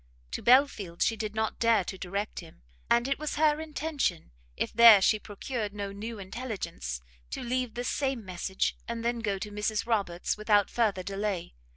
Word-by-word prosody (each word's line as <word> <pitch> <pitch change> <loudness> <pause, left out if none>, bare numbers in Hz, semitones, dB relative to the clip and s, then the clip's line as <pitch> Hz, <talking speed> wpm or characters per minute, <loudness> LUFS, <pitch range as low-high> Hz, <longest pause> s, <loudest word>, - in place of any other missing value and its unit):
To - - -3
Belfield's 235 -9 +3
she 225 - +1
did 215 -1 -4
not 220 0 -1
dare 230 -4 +4
to 190 - -6
direct 200 +3 -4
him; 165 - -13 0.3
and 235 +1 +3
it 275 0 0
was 305 0 -3
her 305 0 +3
intention, 300 - -2 0.3
if - - -2
there 230 -2 +9
she 215 +3 +3
procured 210 0 -5
no 200 -1 -4
new 215 +3 -6
intelligence, 190 - -5 0.3
to - - -5
leave 250 -1 -2
the 245 - -3
same 265 -3 -1
message, 185 +1 -2
and 235 0 -4
then 240 0 0
go 205 -4 -1
to 210 +2 -6
Mrs 210 +1 -1
Roberts 200 -7 -1
without 210 -1 +3
further 210 -6 +1
delay. 195 - -3
215 Hz, 180 wpm, -29 LUFS, 195-240 Hz, 0.3 s, there